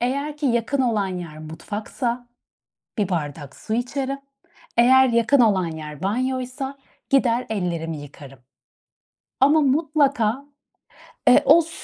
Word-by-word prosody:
...eğer 280 +5 -2
ki 295 -2 -2
yakın 240 +3 +1
olan 220 -5 +1
yer 175 -4 -6
mutfaksa 215 - -5 0.7
bir 205 -3 0
bardak 145 -5 -4
su 215 - -6
içerim; 265 +3 -2 0.6
eğer 260 +2 +6
yakın 235 +4 +3
olan 200 -6 +3
yer 150 0 -8
banyoysa 255 +5 -2 0.3
gider 250 -3 +2
ellerimi 170 -6 -3
yıkarım. 140 -2 -12 1.0
Ama 290 +4 +5
mutlaka, 280 -4 +1 0.8
eee, - - +7
o 340 - +7
s 325 - -9
235 Hz, 115 wpm, -22 LUFS, 180-270 Hz, 1.0 s, eee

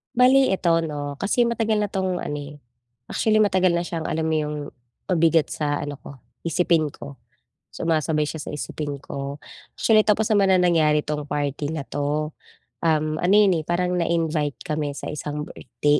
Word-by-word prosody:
Bali 260 +2 +6
eto 170 -3 +2
'no 145 -3 -4
kasi 225 +5 +2
matagal 225 -2 0
na 210 -1 -1
'tong 190 -2 -1
ano 145 - -3
eh, 145 +1 -8 0.6
actually 220 -1 +1
matagal 185 -3 +3
na 170 - 0
siyang 165 -2 -4
alam 160 - -1
mo 160 0 +1
yung 150 0 -3 0.6
mabigat 165 -2 +3
sa 145 -1 -1
ano 145 -1 -6
ko 140 - -11 0.3
isipin 165 -1 +2
ko, 70 - -10 0.6
sumasabay 160 -1 +1
siya 160 - -5
sa - - -4
isipin 145 0 -4
ko 140 +1 -6 0.3
actually. 215 -1 +4
Tapos 215 +1 +2
naman 195 -3 +4
na - - +3
nangyari 155 -4 +3
'tong 150 -1 -4
party 145 0 -2
na 150 - -3
'to. 145 +2 -2 0.5
Um, 155 0 +1
ano 180 +3 +2
yun 195 -5 +5
eh, - - -5
parang 180 +1 0
na-invite 160 -4 0
kami 150 -2 -2
sa - - -5
isang 150 0 -4
birthday. 150 0 -1
160 Hz, 175 wpm, -23 LUFS, 150-180 Hz, 0.6 s, Bali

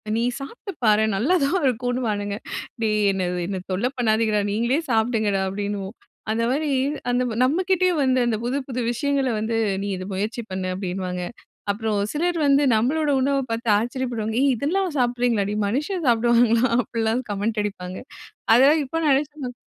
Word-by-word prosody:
நீ 230 - +1 0.2
சாப்பிட்டு 395 - -8
பாரேன்! 220 0 +3
நல்லாதான் 295 - +2
இருக்குன்னுவானுங்க. 230 -5 -1 0.4
"டேய்! 215 -1 +1
என்ன 190 -1 -2
த - - -2
என்ன 195 -2 -3
தொல்ல 200 +7 0
பண்ணாதீங்கடா! 220 -2 +2
நீங்களே 235 +7 +1
சாப்பிடுங்கடா!" 220 -3 +1
அப்பிடின்னுவோம். 200 +1 -4 0.4
அந்தமாரி 250 +7 0 0.4
அந்த 245 +1 +2 0.2
நம்ம 305 +9 +2
கிட்டேயும் 365 -4 +3
வந்து 260 -1 +2
அந்த 225 -2 +1
புத 265 +3 0
புது 250 -1 -2
விஷயங்கள 275 +2 0
வந்து 225 +1 -1 0.3
"நீ - - -3
இது 185 - -6
முயற்சி 210 +5 -2
பண்ணு" 185 0 -3
அப்பிடின்னுவாங்க. 185 -1 -3 0.5
அப்புறம் 215 0 -2 0.2
சிலர் 340 +3 0
வந்து 280 +1 +4
நம்மளோட 290 +7 +1
உணவ 275 +1 +2
பார்த்து 230 +1 -2
ஆச்சரியப்படுவாங்க. 235 -2 -3
"ஏய்! 275 -1 +4
இதெல்லாம் 365 - 0
சாப்பிட்றீங்களாடி! 240 -5 +1
மனுஷன் 300 - -2
சாப்பிடுவாங்களா!" 235 0 +4 0.2
அப்புட்லாம் 230 +2 -1
கமெண்ட் 210 +2 -1
அடிப்பாங்க. 185 -3 -5 0.6
அதெல்லாம் 285 +6 +5
இப்ப 325 +5 -2
நினைச்சாலும். 280 -2 0
235 Hz, 145 wpm, -23 LUFS, 210-275 Hz, 0.6 s, அதெல்லாம்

